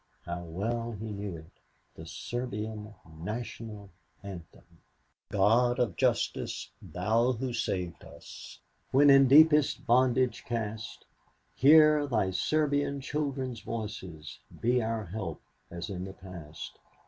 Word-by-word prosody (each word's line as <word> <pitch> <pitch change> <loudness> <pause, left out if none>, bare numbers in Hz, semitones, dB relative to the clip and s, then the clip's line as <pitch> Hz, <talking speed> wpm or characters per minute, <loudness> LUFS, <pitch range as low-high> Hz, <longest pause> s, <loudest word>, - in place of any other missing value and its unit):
How 85 0 -4
well 115 +8 -3
he 110 +1 -6
knew 100 -3 -5
it! 80 +1 -14 0.4
The 80 - -11
Serbian 110 0 -5 0.2
National 105 +1 -6 0.3
Anthem: 90 -5 -10 0.7
"God 115 +5 +3
of 120 -9 0
Justice! - - -1
Thou 115 +7 +1
Who 125 +1 -3
saved 90 -7 -3
us - - -11 0.3
When 140 +2 +6
in 135 -1 +7
deepest 150 +1 +6
bondage 125 0 +3
cast, 110 -1 -5 0.5
Hear 150 +2 +6
Thy 110 -7 +1
Serbian 145 - +1
children's 135 -4 -3
voices, 100 -9 -6 0.2
Be 125 +2 +2
our 110 -1 -2
help 95 -3 -5 0.3
as 85 +4 -6
in 90 -1 -4
the 95 - -8
past. 85 -6 -10
110 Hz, 115 wpm, -30 LUFS, 95-130 Hz, 0.7 s, in